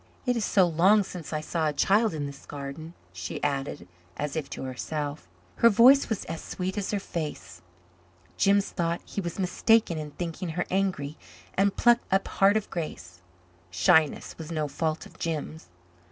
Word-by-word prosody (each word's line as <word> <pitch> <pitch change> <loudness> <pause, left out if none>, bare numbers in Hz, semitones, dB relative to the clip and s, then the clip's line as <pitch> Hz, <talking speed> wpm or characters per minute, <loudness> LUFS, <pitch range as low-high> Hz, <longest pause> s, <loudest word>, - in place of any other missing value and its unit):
"It 250 -1 +2
is 230 - -1
so 195 -2 +4
long 185 +5 +4
since 180 -4 -8
I 155 -1 -2
saw 160 0 -1
a 150 - 0
child 205 +5 +3
in 145 -2 -3
this 140 -1 -9
garden," 145 +4 -7 0.2
she 90 0 -5
added, 135 -10 -2 0.3
as 150 0 -3
if 150 -3 -3
to - - -6
herself. 145 - -4 0.3
Her 235 - +7
voice 250 +6 +6
was 220 - -2
as 165 - -5
sweet 185 +1 -4
as 200 -2 -2
her 205 - 0
face. 150 - -6 0.7
Jims 200 0 +3
thought 170 0 -1
he 200 - -4
was 170 -2 -5
mistaken 195 -1 +2
in 150 -1 -5
thinking 170 +3 -5
her 175 - 0
angry 180 -6 -1 0.3
and 195 +1 +1
plucked 240 -2 +3
up 195 +1 +2
heart 200 +2 +4
of 215 - -3
grace. 90 - -6 0.5
Shyness 150 - +2
was 160 0 -7
no 155 -2 -1
fault 155 +3 -2
of - - -16
Jims. 160 -1 -4
165 Hz, 175 wpm, -27 LUFS, 150-195 Hz, 0.7 s, Her